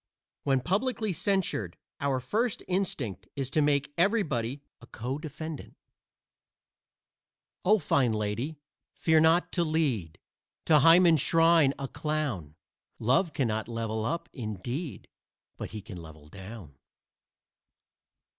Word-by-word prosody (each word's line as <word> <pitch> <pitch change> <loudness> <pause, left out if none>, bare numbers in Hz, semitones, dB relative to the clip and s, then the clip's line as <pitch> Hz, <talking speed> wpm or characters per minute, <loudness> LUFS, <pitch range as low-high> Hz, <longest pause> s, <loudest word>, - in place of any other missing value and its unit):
When 135 -2 +1
publicly 215 - 0
censured 175 - -1 0.2
our 140 -2 0
first 220 - -1
instinct 125 - -2
is 135 -2 -3
to 155 - +2
make 145 -1 +1
everybody 145 - +1 0.2
a 120 - -14
codefendant. 150 +5 -6 1.9
O 210 +4 +5 0.2
lady 115 +2 0
fine, - - -23 0.4
fear 160 -1 +3
not 160 +3 +4
to 175 - +1
lead 140 - 0 0.5
To 155 -2 +6
Hymen's 165 0 +6
shrine 165 -4 +4
a 135 - -4
clown: 135 - -3 0.4
Love 135 - +2
cannot 110 -6 -1
level 115 -2 -3
up, 165 +9 -2
indeed, 120 - -5 0.5
But - - -6
he 105 -1 -7
can 100 -5 -9
level 80 -2 -13
down. 95 -4 -10
140 Hz, 110 wpm, -29 LUFS, 110-165 Hz, 1.9 s, To